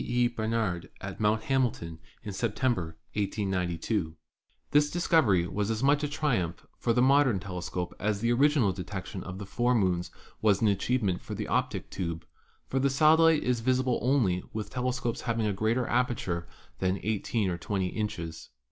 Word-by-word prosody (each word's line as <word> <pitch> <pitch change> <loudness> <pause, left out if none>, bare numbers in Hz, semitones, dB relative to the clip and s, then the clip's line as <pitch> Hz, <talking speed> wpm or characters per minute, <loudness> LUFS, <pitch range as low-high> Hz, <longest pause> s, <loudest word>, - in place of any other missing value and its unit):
E. 120 0 +2
Bar 115 -2 -4
nard 105 -7 -1
at - - -7
Mt. 110 +1 +2
Hamilton 115 -12 -1 0.2
in 105 - -5
September, 105 -6 -1 0.2
1892. 95 -3 -1 0.6
This 145 0 +4
dis 175 0 -2
covery 100 - +4
was 100 +3 -2
as 110 +2 -1
much 145 +2 +3
a - - +1
triumph 125 - -1
for 120 - +1
the 125 +2 +3
modern 135 -5 +4
telescope 90 -2 -4
as 105 -1 0
the 115 +2 +1
original 135 -4 +4
detection 95 0 -6
of 95 0 -7
the 100 - -6
four 120 +5 +1
moons 90 -5 +1 0.3
was 105 -3 +4
an 110 - +3
achievement 100 -2 0
for - - -6
the - - -3
"Optick - - -1
Tube," 85 -3 -4 0.4
for 135 - -1
the 140 +1 +3
satellite 155 +3 +5
is 125 -2 +1
visible 130 +1 +1
only 120 -9 +2
with 110 -1 -5
telescopes 125 -2 -2
having 115 -2 -1
a 105 - +1
greater 110 +5 +1
aperture 110 -9 0 0.3
than 95 +1 0
18 105 -1 0
or 85 - -4
20 95 0 -1
inches. 85 -7 -4
110 Hz, 170 wpm, -29 LUFS, 95-125 Hz, 0.6 s, satellite